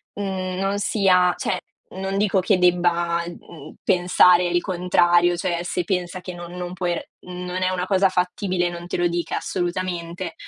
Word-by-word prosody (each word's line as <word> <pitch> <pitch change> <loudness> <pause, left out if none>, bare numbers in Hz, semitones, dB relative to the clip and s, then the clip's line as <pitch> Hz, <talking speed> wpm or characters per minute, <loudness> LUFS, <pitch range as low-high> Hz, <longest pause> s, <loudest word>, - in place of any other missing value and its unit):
mhmm, 185 -2 -3
non 195 +1 0
sia 185 -4 +3
cioè - - -1 0.4
non 195 +1 -3
dico 200 -1 +2
che 185 +1 +2
debba, 175 -1 +2
mhmm, 160 -3 -11
pensare 180 -1 +4
il 175 0 +1
contrario, 175 -1 +3
cioè 170 0 -1
se 180 0 -2
pensa 180 -1 -2
che 180 0 -7
non 175 0 -9
non 180 0 -5
puoi 175 -1 -1 0.3
non 180 0 -5
è 185 - +2
una 180 -1 -2
cosa 195 0 +3
fattibile, 180 0 -1
non 175 0 -8
te - - -3
lo 175 0 +2
dica 175 0 -2
assolutamente, 175 0 -3
180 Hz, 165 wpm, -22 LUFS, 175-185 Hz, 0.4 s, pensare